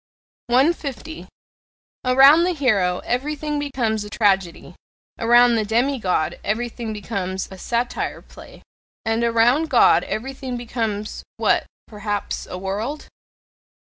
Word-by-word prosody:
150. 280 +2 0 0.8
Around 270 +6 +6
the 360 0 0
hero 200 - +1
everything 295 +3 -2
becomes 240 -7 -1
a 210 - -9
tragedy; 195 -5 0 0.5
around 240 +1 +5
the 225 -2 +1
demigod 225 - 0
everything 230 +1 -3
becomes 195 -3 -4
a 190 - -9
satyr 240 +3 -2
play; - - -15 0.4
and 225 +1 0
around 235 +7 +3
God - - +5
everything 260 +1 -5
becomes 225 -3 -4 0.2
what? - - +1 0.2
perhaps 205 -1 -4
a 180 - -6
"world"? 210 +10 -4
235 Hz, 110 wpm, -21 LUFS, 210-270 Hz, 0.8 s, Around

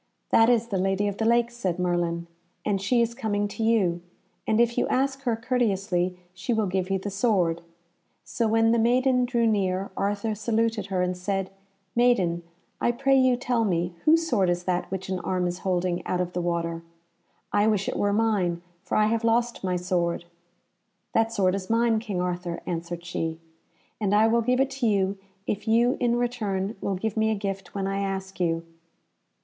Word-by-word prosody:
"That 225 +1 +6
is 235 -1 +2
the 195 -4 -1
Lady 195 +2 +1
of 200 0 -3
the 220 - +1
Lake," 235 +1 +3
said 190 -8 -2
Merlin, 175 -1 0 0.4
"and 200 -2 0
she 235 +4 +3
is 235 0 -2
coming 205 -4 -1
to 225 - -4
you, 195 -7 +2 0.5
and 220 0 +2
if 235 0 +3
you - - +1
ask 270 +1 0
her 235 -2 +2
courteously 195 -7 0 0.2
she 190 +6 -2
will 220 -2 +1
give 185 0 -1
you 195 - +1
the 200 +2 -5
sword." 190 -6 +1 0.6
So 230 - -1
when 225 +1 +3
the 235 - +3
maiden 250 +2 +3
drew 240 -1 +1
near, 195 -3 0
Arthur 205 +2 -1
saluted 220 -1 0
her 185 -2 0
and 180 0 -1
said, 195 +1 -2 0.4
"Maiden, 210 -9 +3 0.4
I - - +3
pray 270 +2 +2
you 255 -1 +4
tell 240 -2 0
me 175 -3 0
whose 325 +1 +4
sword 200 - +2
is 175 0 0
that 180 0 -1
which 190 0 -4
an 185 -1 -1
arm 180 0 -1
is 175 0 -2
holding 180 -2 -1
out 180 - 0
of 180 0 -2
the 180 - -1
water? 170 -1 -2 0.7
I 205 +1 +3
wish 205 -3 +1
it - - -2
were 205 - +1
mine, 200 -6 +1 0.2
for - - -2
I 215 - +4
have 225 +1 0
lost 235 0 +1
my 185 -1 0
sword." 175 -1 -1 0.9
"That 225 0 +2
sword 190 -5 +2
is 190 -1 -4
mine, 230 0 +3
King 210 -5 -4
Arthur," 175 -1 -2
answered 170 0 -4
she, 165 -2 -3 0.6
"and 205 -1 +1
I 215 +1 +5
will 230 +1 +3
give 250 +2 +1
it 270 0 +2
to 270 -3 -1
you, 195 -2 +1 0.3
if 210 +2 -3
you 235 +3 +4
in 240 -1 +2
return 220 -5 -1
will 195 - -1
give 210 +3 -3
me 220 0 +2
a 220 - +1
gift 195 -1 -5
when 195 -1 -1
I 195 0 -1
ask 195 -1 -4
you." 165 -2 0
200 Hz, 195 wpm, -26 LUFS, 180-230 Hz, 0.9 s, That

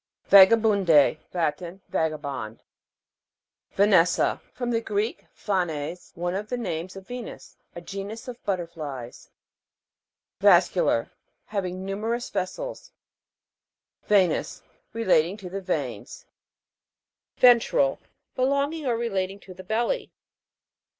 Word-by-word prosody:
VAGABUN'D,E. 195 -7 +6
Latin. 170 +2 -2
Vagabond. 140 -8 -3 1.1
VANES'SA. 190 -4 +3
From 245 -1 -3
the 230 -1 +1
Greek, 210 -2 -2
phanes, 175 -4 -3
one 175 +1 -2
of 205 +3 -4
the 250 - -2
names 180 -6 -4
of 195 -1 -10
Venus. 245 -2 -8 0.2
A 170 - -7
genus 200 +7 -7
of 245 -1 -9
butterflies. 155 - -5 1.1
VAS'CULAR. 115 - +3 0.3
Having 185 -2 -4
numerous 225 +5 -3
ves 185 -2 -1
sels. - - -8 1.2
VE'NOUS. 190 -6 +2 0.3
Relating 190 -5 +2
to 185 -4 -9
the 195 +1 -4
veins. 140 - -4 1.1
VEN'TRAL. 235 - +4 0.4
Belonging 280 +3 0
or 235 -2 +1
relating 195 -4 -2
to 185 - -12
the 185 +1 -11
belly. 235 - -1
195 Hz, 100 wpm, -25 LUFS, 170-225 Hz, 1.2 s, VAGABUN'D,E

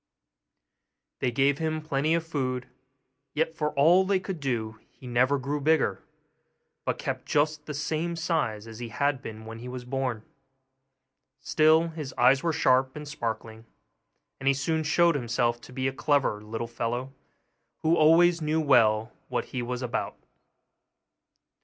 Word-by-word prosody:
They 125 - +1
gave 135 +3 +2
him 155 -1 -1
plenty 155 +1 0
of 165 -1 -1
food, 130 -5 -2 0.7
yet 160 +1 0
for 150 -2 -1
all 165 +6 +5
they 190 0 +1
could 185 -3 -5
do 115 -5 -3
he - - -17
never 125 +3 +2
grew 140 +2 -3
bigger, 155 +1 +2 0.8
but - - -1
kept - - -4
just 150 0 0
the 150 - -4
same 160 +3 -2
size 160 -11 -1
as 115 0 -10
he 120 -1 -5
had 140 +3 0
been 110 -2 -8
when 115 0 -8
he 120 - -8
was 125 -1 -7
born. 125 -4 -2 1.1
Still, 160 +2 +3
his 155 -5 -7
eyes 130 +2 +5
were 170 - +1
sharp 130 -3 +2
and 150 0 -7
sparkling, 115 -4 -5 0.7
and 135 - -4
he 135 - +4
soon 160 +4 0
showed 170 +2 +3
himself 120 -3 0
to - - -13
be 130 +1 -2
a 135 - -2
clever 135 -7 +1
little 115 +2 -5
fellow, 120 +3 -3 0.7
who 160 +1 +4
always 170 +2 +5
knew 155 +1 +1
well 115 -6 +3 0.2
what - - -1
he 125 - -1
was 125 +1 -4
about. 125 -1 -3
135 Hz, 155 wpm, -27 LUFS, 120-155 Hz, 1.1 s, all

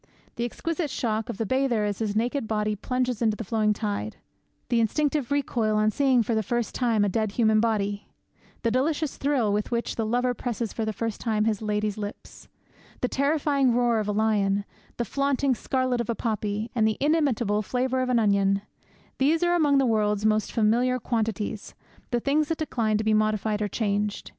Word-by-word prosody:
The 235 - -2
exquisite 325 +6 -3
shock 220 -4 -2
of - - -4
the 225 - -1
bather 255 -2 +1
as 205 -2 -2
his 210 -2 -2
naked 240 +2 0
body 210 -1 0
plunges 250 +2 -2
into 220 -2 +2
the - - -4
flowing 215 +1 +1
tide; 210 0 -3 0.5
the 235 - +2
instinctive 290 +4 0
recoil 240 -6 0
on 215 0 +3
seeing 260 -1 +3
for 230 - -1
the 220 - +2
first 240 +2 -2
time 230 -5 +2
a - - +1
dead 215 +1 -1
human 220 -2 +3
body; 205 -2 -1 0.6
the 230 - +2
delicious 290 +4 0
thrill 265 -7 +1
with 210 0 -1
which 235 -1 -2
the 225 - 0
lover 245 +3 +1
presses 235 -2 -4
for 225 - -2
the 220 - -1
first 225 +1 -4
time 215 -2 0
his 220 -2 0
lady's 210 -1 -1
lips; 205 0 -8 0.5
the 250 - +2
terrifying 280 -2 +1
roar 240 -2 +2
of 210 - -2
a - - +1
lion, 205 -2 +1 0.3
the 235 - -1
flaunting 275 +2 +1
scarlet 255 0 -1
of 235 - -6
a 235 - 0
poppy, 215 -1 -2
and 220 -3 +2
the 215 - 0
inimitable 265 -9 +1
flavour 255 +4 -1
of 255 - -1
an 250 - +3
onion 200 -2 +2 0.6
these 315 +5 +3
are 350 0 +3
among 295 -5 +3
the 270 - +3
world's 210 -2 +1
most 215 -1 +2
familiar 235 +3 +2
quantities, 220 -3 -3 0.3
the 240 - 0
things 290 +4 +1
that 325 - -1
decline 225 -8 0
to 215 - -2
be 220 0 +2
modified 215 0 +1
or 210 - +1
changed. 205 0 -2
225 Hz, 195 wpm, -26 LUFS, 215-255 Hz, 0.6 s, on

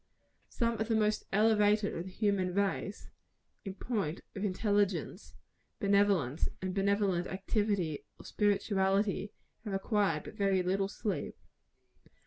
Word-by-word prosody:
Some 235 -1 -1
of 220 - 0
the 225 - +1
most 215 -1 +1
elevated 210 0 +3
of 170 - -4
the - - -7
human 190 -3 0
race, 200 +1 -2 0.5
in 195 -2 -6
point 195 -9 -2
of 195 - -4
intelligence, 200 -2 0 0.4
benevolence, 200 -8 +2
and 185 0 -3
benevolent 195 -2 +1
activity 195 -5 -1
or - - -14
spirituality 200 -1 +1 0.3
have 210 -4 -4
required 195 -5 +1
but - - -9
very 195 -3 +1
little 195 +2 +1
sleep. 205 +1 -3
200 Hz, 120 wpm, -32 LUFS, 190-210 Hz, 0.5 s, elevated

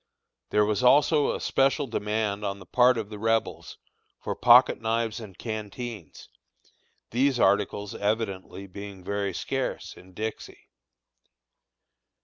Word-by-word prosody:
There 105 0 +3
was 105 +2 0
also 145 +3 +4
a - - -5
special 135 +2 +1
demand 105 -3 -2
on 100 -1 -2
the 95 - -13
part 125 +5 +4
of 110 -2 -5
the 105 - -7
Rebels 115 +1 -1 0.4
for - - -4
pocket 125 0 +6
knives 115 0 -1
and 105 -5 -11
canteens, 110 - -7 0.8
these 130 +1 +1
articles 100 0 +1
evidently 100 -2 -3
being 100 0 -10
very 100 +1 -2
scarce - - -4
in 95 0 -16
Dixie. 110 +3 -7
110 Hz, 125 wpm, -26 LUFS, 100-120 Hz, 0.8 s, pocket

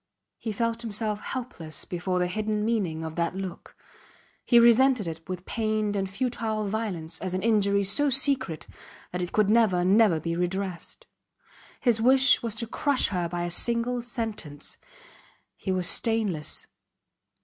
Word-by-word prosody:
He 225 - -4
felt 230 +2 -2
himself 215 -2 -3
helpless 235 -12 -3
before 180 +1 -3
the 180 - +1
hidden 210 +3 -2
meaning 190 -9 -1
of 160 - -6
that 170 +1 -1
look; 190 -2 -7 0.7
he 240 - +4
resented 235 -2 +4
it 165 +2 -8
with 180 0 -5
pained 215 -2 -1
and 195 -1 -2
futile 225 0 -2
violence 190 -6 -4
as 185 -1 -3
an 185 - -3
injury 200 -3 +2
so 280 +10 +2
secret 265 - +2 0.5
that 180 - -3
it 175 - -3
could 215 -2 +2
never, 210 -6 +3
never 195 -3 +4
be 165 +2 -3
redressed. 180 0 -4 0.8
His 235 -3 +2
wish 260 +2 +5
was 230 -2 -3
to 230 +1 -2
crush 275 +4 +1
her 180 -3 -2
by 175 0 -3
a 175 - -3
single 235 +5 +2
sentence. 225 - -6 0.8
He 190 - -4
was 185 -1 +1
stainless. 210 - +1
210 Hz, 150 wpm, -26 LUFS, 180-230 Hz, 0.8 s, wish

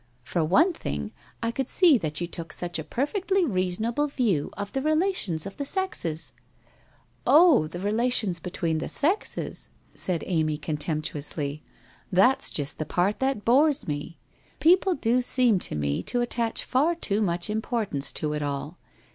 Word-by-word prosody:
For 170 +6 -1
one 315 - +4
thing, - - -5 0.3
I 230 - 0
could 265 +1 -3
see 350 -6 +5
that 155 -3 -3
you 175 - -1
took 170 -2 -7
such 175 -1 -2
a - - -4
perfectly 370 - 0
reasonable 220 - 0
view 225 - 0
of 205 0 -5
the 270 - -2
re 310 +2 +2
lations 310 - 0
of 195 - -8
the 285 - -2
sexes. 275 - -2
5 - - -37 0.3
' - - -23
Oh, 305 - +6
the 175 +3 -7
relations 215 -2 +1
between 165 -2 -2
the - - -4
sexes 350 +9 -2 0.2
1' - - -26
said 180 -3 +1
Amy 155 -4 0
con 150 0 -3
temptuously. 150 -1 -2 0.5
"That's 250 +9 +4
just 145 -1 -2
the 155 - -2
part 185 +6 0
that 265 -5 -1
bores 280 +4 +3
me. 145 +2 -4 0.4
People 365 +2 +4
do 250 -1 +1
seem 245 -5 +4
to - - 0
me 70 -1 -1
to 245 - -1
attach 235 -1 0
far 300 +7 +1
too 215 -10 0
much 175 -3 0
importance 215 - -2
to 150 -1 -2
it 150 - -3
all. 145 +3 -4
205 Hz, 170 wpm, -26 LUFS, 160-270 Hz, 0.5 s, Oh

